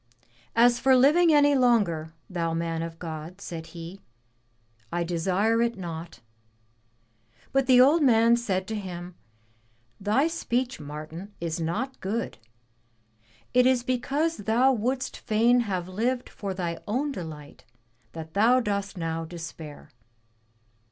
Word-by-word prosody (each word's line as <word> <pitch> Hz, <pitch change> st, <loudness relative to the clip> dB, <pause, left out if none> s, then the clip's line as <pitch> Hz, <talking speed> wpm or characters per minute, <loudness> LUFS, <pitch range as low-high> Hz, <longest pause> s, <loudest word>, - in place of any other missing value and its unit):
As 240 Hz, +1 st, +5 dB
for 265 Hz, +1 st, +5 dB
living 310 Hz, +7 st, +5 dB
any 290 Hz, -1 st, +5 dB
longer, 205 Hz, -, +2 dB, 0.2 s
thou 165 Hz, -3 st, -2 dB
man 165 Hz, 0 st, -2 dB
of 165 Hz, 0 st, -6 dB
God,*' 165 Hz, +2 st, -7 dB
said 165 Hz, -4 st, -7 dB
he, 170 Hz, +3 st, -9 dB, 0.9 s
I 175 Hz, 0 st, 0 dB
desire 190 Hz, +7 st, +1 dB
it 235 Hz, -2 st, 0 dB
not.'* 170 Hz, -2 st, -7 dB, 1.3 s
But 270 Hz, -1 st, +2 dB
the 250 Hz, -1 st, +7 dB
old 295 Hz, +6 st, +5 dB
man 235 Hz, -3 st, +5 dB
said 195 Hz, -6 st, -1 dB
to 220 Hz, -, -2 dB
him, 180 Hz, -3 st, -6 dB, 0.9 s
*Thy 210 Hz, +8 st, +2 dB
speech, 255 Hz, -7 st, -2 dB
Martin, 155 Hz, +7 st, -8 dB
is 165 Hz, -1 st, -3 dB
not 215 Hz, +12 st, -3 dB
good. 215 Hz, -, -3 dB, 1.1 s
It 250 Hz, 0 st, +5 dB
is 255 Hz, -2 st, +3 dB
because 275 Hz, +6 st, 0 dB
thou 235 Hz, +6 st, +3 dB
wouldst 255 Hz, +3 st, -2 dB
fain 230 Hz, +3 st, +3 dB
have 190 Hz, -6 st, -2 dB
lived 240 Hz, +7 st, -1 dB
for 195 Hz, -2 st, -5 dB
thy 170 Hz, -2 st, -3 dB
own 265 Hz, +7 st, -1 dB
delight 155 Hz, -, -8 dB, 0.5 s
that 160 Hz, -1 st, -8 dB
thou 230 Hz, +6 st, +4 dB
dost 200 Hz, -4 st, -2 dB
now 165 Hz, -1 st, -2 dB
despair.' 165 Hz, -3 st, -9 dB
205 Hz, 130 wpm, -26 LUFS, 170-250 Hz, 1.3 s, the